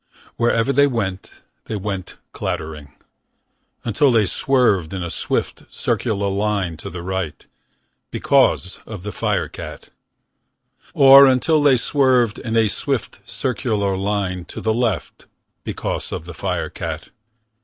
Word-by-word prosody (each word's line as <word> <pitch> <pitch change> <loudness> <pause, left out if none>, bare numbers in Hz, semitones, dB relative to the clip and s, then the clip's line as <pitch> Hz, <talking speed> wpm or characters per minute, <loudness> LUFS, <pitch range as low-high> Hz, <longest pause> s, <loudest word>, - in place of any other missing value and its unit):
Wherever 115 +2 +2
they 140 +2 +5
went. 100 -8 -3 0.4
They 110 - -4
went 95 -2 -5
clattering. 75 -2 -5 0.9
Until 120 +5 +3
they 110 -3 +4
swerved. 95 -5 +1
In 95 - -3
a 85 - -4
swift, - - -2
circular 100 -2 -1
line. 100 -3 -1
To - - -7
the 85 0 -7
right. 95 -4 -4 0.6
Because 95 - +2
of 105 -5 -8
the 105 - -4
firecat. - - -3 1.1
Or 135 0 +9
until 140 +4 +3
they 140 -3 +5
swerved. 125 -3 +2
In 115 -1 -2
a 110 -1 +4
swift, 100 - -3
circular 105 -5 -1
line. 95 -2 -2
To - - -8
the 110 - 0
left. 115 -2 -2 0.4
Because - - -4
of 80 - -5
the 85 - -8
firecat. 80 - -4
105 Hz, 125 wpm, -20 LUFS, 95-120 Hz, 1.1 s, Or